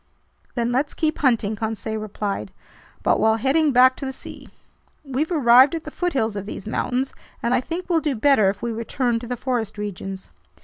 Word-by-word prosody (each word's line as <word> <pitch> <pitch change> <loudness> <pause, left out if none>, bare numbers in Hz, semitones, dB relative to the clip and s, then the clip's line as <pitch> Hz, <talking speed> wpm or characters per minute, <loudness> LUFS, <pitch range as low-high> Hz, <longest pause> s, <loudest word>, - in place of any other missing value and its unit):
"Then 235 -1 0
let's 275 +4 0
keep 310 -2 0
hunting," 230 -6 +2
Conseil 220 0 -3
replied, 200 - -4 0.5
"but - - +3
while 220 0 +4
heading 280 +6 +2
back 255 +1 +6
to - - -5
the - - -2
sea. 265 - -11 0.6
We've 275 +5 -2
arrived 260 -1 +6
at 325 - -5
the 305 - -8
foothills 265 - -1
of 200 0 -5
these 210 - -7
mountains, 250 +4 -1 0.3
and 235 - +1
I 245 - +3
think 340 +6 -5
we'll 340 -3 +3
do 295 -4 -1
better 225 -4 +4
if 195 +3 -5
we 235 - -1
return 230 +1 -1
to 240 - -8
the 245 +1 -3
forest 230 -5 -2
regions." 195 -2 -6
245 Hz, 190 wpm, -23 LUFS, 220-275 Hz, 0.6 s, back